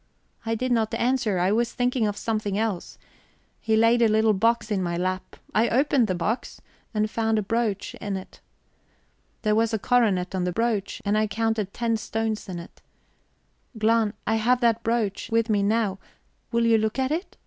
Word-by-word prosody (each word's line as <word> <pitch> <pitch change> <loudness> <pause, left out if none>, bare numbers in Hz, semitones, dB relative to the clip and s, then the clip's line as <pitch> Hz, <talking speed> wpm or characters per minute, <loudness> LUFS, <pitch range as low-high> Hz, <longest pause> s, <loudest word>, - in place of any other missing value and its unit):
I 225 - +1
did 255 +3 -2
not 225 -2 +1
answer 240 -5 +1
I 180 +2 +2
was 230 +2 +1
thinking 245 -2 +1
of 205 0 -3
something 215 -3 -2
else. 215 -5 -2 0.6
He 220 -1 +1
laid 230 +2 +4
a 230 - +6
little 220 0 +3
box 230 +2 +1
in 200 -2 +1
my 170 -1 -2
lap. 185 +1 -3 0.2
I 225 +2 +3
opened 265 -1 +3
the 185 - -1
box, 210 +8 -3 0.3
and 215 -1 0
found 225 0 0
a 215 - 0
brooch 215 -1 -1
in 200 -2 -4
it. 190 - -11 1.0
There 215 -1 +2
was 225 +1 +2
a - - +1
coronet 205 -6 +1
on 185 -1 -1
the 180 - 0
brooch, 215 0 -1
and 205 +1 +1
I 215 0 +2
counted 220 -1 -1
ten 230 0 -1
stones 220 -1 -3
in 180 - -4
it... 170 +1 -11 1.0
Glahn, 220 -1 +2
I 220 - +1
have 245 +3 +2
that 230 -1 +3
brooch 225 -3 -1
with 230 0 +2
me 205 -1 +2
now; 205 -1 +1 0.5
will 235 0 +2
you 225 -1 +4
look 215 +2 -1
at 265 +1 0
it? 335 +5 -3
220 Hz, 190 wpm, -25 LUFS, 205-230 Hz, 1.0 s, a